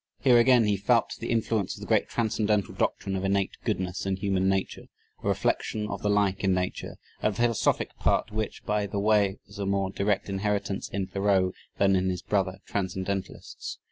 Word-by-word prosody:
Here 125 -3 +5
again 125 0 +6
he 105 -1 +2
felt 115 +4 +2
the 115 - -5
influence 110 -3 0
of - - -12
the - - -6
great - - +2
transcendental 105 -3 0
doctrine 95 - -1
of 95 - -2
"innate 95 0 +1
goodness" 90 -1 -2
in 95 -1 0
human 95 -1 +1
nature 95 -1 -1 0.4
a - - -2
reflection 105 -1 0
of - - -4
the 105 - 0
like 100 -2 +2
in 95 -1 +3
nature; 90 0 -3 0.2
a 105 - +2
philosophic 115 +2 +1
part - - +1
which, 110 0 -4
by 105 -1 0
the 100 +1 -4
way, 105 -1 +3
was 100 +1 -13
a 100 - -2
more 95 -1 0
direct 100 +1 0
inheritance 100 0 -2
in 100 -1 -2
Thoreau 95 -1 +1 0.3
than 100 -1 +4
in 95 0 +1
his 90 -1 -3
brother 95 -2 -1
transcendentalists. 95 0 -4
100 Hz, 185 wpm, -27 LUFS, 95-105 Hz, 0.4 s, again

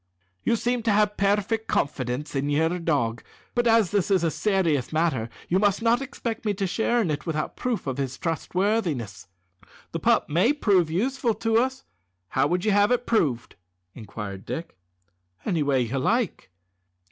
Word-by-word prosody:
"You - - +2
seem 245 +1 0
to 225 -1 +1
have 210 0 +2
perfect 210 +3 +1
confidence 140 0 -2
in 140 +1 0
your 160 +4 +1
dog, 120 -9 0 0.3
but 240 0 +1
as 225 -5 +4
this 205 -2 +1
is 190 -3 +3
a 165 - +2
serious 175 - 0
matter 155 -8 0 0.2
you 185 - +2
must 205 +1 +2
not 235 +2 +3
expect 245 -4 -5
me 210 -2 0
to 195 - -1
share 230 +5 +1
in 170 - -1
it 150 +3 -4
without 155 -2 -2
proof 250 -3 -2
of 135 -1 -3
his 130 -1 -3
trustworthiness." 165 - -1 0.6
"The - - -3
pup - - +2
may 185 - +3
be 230 -9 0 0.2
useful 240 - 0
to 225 +1 +1
us; 260 +2 -1 0.5
how - - +2
would 180 +2 -1
you 215 - +3
have 205 +1 +4
it 245 0 +1
proved?" 145 - 0 0.4
inquired 105 -3 -7
Dick. 165 - -6 0.7
"Any 165 -4 0
way 140 -3 +2
you 125 +3 -1
like." 225 - 0
185 Hz, 170 wpm, -25 LUFS, 145-225 Hz, 0.7 s, as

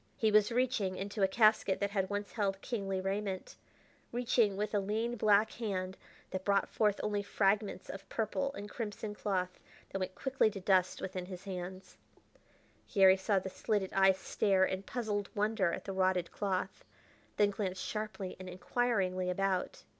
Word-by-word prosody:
He 220 -1 +2
was 210 +1 +5
reaching, 235 -6 +1
into 200 +2 -4
a 195 - +6
casket 215 -1 +3
that 200 0 -1
had 195 -2 0
once 205 0 -3
held 195 -3 -1
kingly 195 -5 -2
raiment 195 0 -3 0.6
reaching 235 -4 +2
with 210 +1 -2
a 205 - +3
lean 220 +4 -1
black 215 -1 +4
hand 190 -5 -3 0.4
that 185 0 -3
brought 200 0 +2
forth 210 -2 +1
only 205 -1 0
fragments 200 -1 0
of 195 0 -8
purple 275 +6 -1
and 205 - -6
crimson 210 -1 -5
cloth 185 -3 -2 0.3
that 195 - -2
went 185 0 -3
quickly 265 -4 +2
to 200 - -7
dust 185 -1 +2
within 185 -1 -4
his 185 -1 -8
hands. 185 -1 -7 0.9
Garry 190 -3 +7
saw 195 +1 +1
the 190 0 -2
slitted 205 -1 -1
eyes 190 -1 +5
stare 190 0 +2
in 190 0 -2
puzzled 205 -2 -3
wonder 210 -3 +1
at - - -5
the 195 - -4
rotted 185 -2 +1
cloth, 190 -2 -2 0.5
then 205 -1 +4
glance 190 -2 -3
sharply 210 -3 -4
and 185 0 -7
inquiringly 185 -2 0
about. 190 0 -1
200 Hz, 165 wpm, -33 LUFS, 190-215 Hz, 0.9 s, Garry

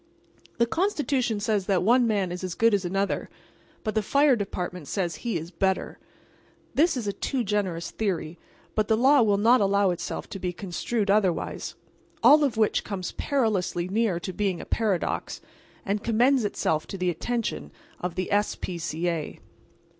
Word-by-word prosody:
The 235 - +4
Constitution 280 - 0
says 205 -2 0
that 190 -4 +2
one 240 +4 +4
man 200 -5 0
is 180 +1 -5
as 185 -2 -3
good 230 -1 +3
as 200 -2 +2
another; 195 +3 -1 0.5
but 215 - -2
the 220 - +2
Fire 280 +5 +4
Department 180 -6 -4
says 175 -5 -2
he 235 -6 -2
is 165 +2 -7
better. 190 +2 -1 0.7
This 320 -1 +3
is 235 - -3
a 200 - -1
too 260 +3 -2
generous 195 -5 -2
theory, 175 -6 -3 0.3
but 215 -1 +1
the 220 - +3
law 270 +3 +5
will 205 -3 +3
not 230 +4 +5
allow 200 -1 +3
itself 175 - -4
to 195 - -6
be 180 -1 -2
construed 200 +3 -2
otherwise. 195 -5 0 0.5
All 300 +1 +7
of 255 -6 0
which 215 -1 +2
comes 190 -4 -4
perilously 210 -10 0
near 205 -3 +1
to 185 - -5
being 195 -2 -1
a - - -7
paradox, 210 -6 -1 0.5
and 205 +1 -1
commends 245 +2 +3
itself 155 -6 -1
to 195 - -6
the 180 -1 +1
attention 230 +7 -3 0.3
of 180 -1 -4
the 185 - -3
S. 205 +1 +1
P. 175 -2 -5
C. 165 +1 -2
A. 165 -3 -3
205 Hz, 175 wpm, -26 LUFS, 180-230 Hz, 0.7 s, All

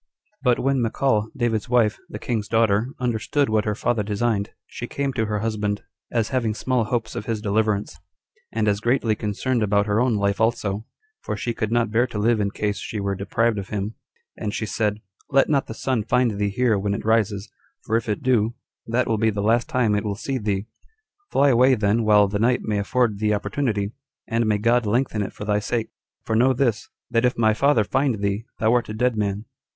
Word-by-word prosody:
But 125 -3 +3
when 135 -1 +1
Michal, 110 -2 +1
David's 120 -2 0
wife, 115 -5 +3
the - - -6
king's 110 -1 -2
daughter, 115 0 +2
understood 125 +3 0
what 110 -1 +1
her 105 -1 0
father 115 +1 0
designed, 105 0 -1 0.2
she 120 - -7
came 140 +1 -2
to 110 -3 -1
her 105 -1 -1
husband, 105 -2 -2 0.3
as 115 -3 0
having 115 -5 0
small 125 -1 0
hopes 110 -1 -2
of 105 - -5
his 115 -2 -1
deliverance, 105 -5 0 0.5
and 110 -1 0
as 100 -1 +2
greatly 120 0 +1
concerned 110 +4 -1
about 100 -1 +2
her 105 +1 +1
own 125 -3 +2
life 100 0 0
also, 110 -2 0 0.4
for - - -4
she 120 - -2
could 110 -1 -2
not 115 -2 +1
bear 120 +3 +3
to 115 - -6
live 110 +2 +2
in 100 - +1
case 105 0 -2
she 110 - -5
were 100 0 -1
deprived 105 +3 0
of 95 - -7
him; 105 +1 -3 0.4
and 105 - -4
she 110 - -2
said, 105 0 -1 0.3
"Let 140 -1 +3
not 140 -3 +1
the 110 - -7
sun 130 -3 0
find 120 +2 +2
thee 100 0 -1
here 110 0 +1
when 100 +1 -1
it - - -6
rises, 105 -2 +1 0.3
for 110 - -1
if 115 -1 0
it 105 - -2
do, 120 -3 +2 0.3
that 120 +3 +1
will 110 -2 0
be 110 0 +3
the 100 -1 -2
last 115 +7 +2
time 125 -8 +2
it 105 - 0
will 105 -2 -2
see 130 +5 -3
thee: 100 -2 -1 0.7
fly 140 +1 +4
away 130 +1 +5
then 110 +1 +1
while 105 -1 +5
the 100 +1 -2
night 125 +3 +2
may 105 -1 -1
afford 110 0 +1
thee 105 0 +2
opportunity, 105 -1 -1 0.4
and 115 0 0
may 105 -1 +2
God 115 +2 +2
lengthen 115 0 +1
it 100 - -3
for 105 - -8
thy 105 0 +1
sake; 115 +1 -2 0.3
for 110 - 0
know 130 +4 +4
this, 120 -4 0 0.2
that 115 0 +2
if 125 0 +2
my 110 -2 +4
father 125 0 +3
find 130 -1 0
thee, 100 +2 -1
thou 110 +1 +2
art 120 -3 +1
a 105 - -4
dead 125 +1 +1
man." 105 0 -2
110 Hz, 215 wpm, -23 LUFS, 105-120 Hz, 0.7 s, away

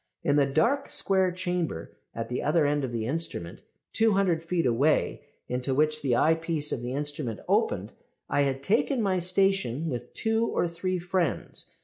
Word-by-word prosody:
"In 145 -4 +2
the 140 -2 +4
dark, 235 - +1
square 190 -2 +2
chamber 175 - -3 0.2
at 115 0 -3
the 125 - -3
other 155 +1 +2
end 145 0 +1
of 130 - -2
the 115 -2 -2
instrument, 135 - -2 0.3
200 195 -7 +3
feet 170 0 -1
away, 130 +6 +2 0.3
into 125 +2 -1
which 155 +1 +2
the 130 -4 +1
eyepiece 160 0 +1
of 120 - -2
the 120 +1 -4
instrument 145 -5 -3
opened, - - +1 0.3
I 145 - +1
had 135 -1 0
taken 230 - +2
my 190 -2 +1
station 180 -5 +1
with 120 -1 -6
two 225 +1 +1
or - - 0
three 185 +2 -2
friends. 175 -1 -2
160 Hz, 165 wpm, -27 LUFS, 135-185 Hz, 0.3 s, the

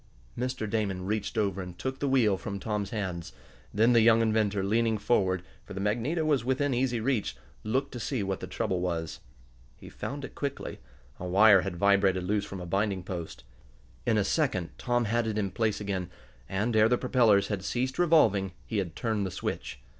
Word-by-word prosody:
Mr. 125 -2 -2
Damon 100 -4 -1
reached 105 +2 -2
over 100 -3 0
and 90 -1 -8
took 130 +6 -4
the 140 - 0
wheel 120 -7 +4
from 100 +1 -5
Tom's 105 -1 -2
hands. 95 -6 -4 0.4
Then 115 +4 +4
the 115 - +6
young 115 0 +5
inventor, 110 -3 +1
leaning 110 +2 +2
forward, 95 -4 +1 0.2
for 100 - -10
the - - -4
magneto 120 - 0
was 145 -6 +2
within 130 +2 0
easy 125 -1 0
reach, 115 -2 -1 0.3
looked 130 +6 -1
to 120 - -6
see 120 -1 -2
what 95 -1 -2
the - - -6
trouble 95 - -1
was. 85 -3 -3 0.6
He - - -12
found 140 0 -5
it - - -11
quickly. 140 -1 -4 0.4
A 90 - -4
wire 100 +1 +6
had 95 0 -4
vibrated 95 0 +3
loose 100 +2 0
from 100 - -7
a 90 - -6
binding 95 +1 -1
post. 90 -3 -6 0.6
In 110 - +2
a 105 - +3
second 95 - 0
Tom 120 -1 +1
had 115 +2 0
it 110 -1 -2
in 100 -3 -1
place 110 -1 0
again; 95 -4 -3 0.4
and, 105 +5 -1
ere 110 +1 +5
the 125 - +3
propellers 115 -6 +3
had 100 -3 -2
ceased 125 - -2
revolving, 110 - +4
he 110 - -1
had 85 -4 -4
turned 110 -4 -1
the 95 - -2
switch. - - -5
105 Hz, 195 wpm, -29 LUFS, 95-120 Hz, 0.6 s, the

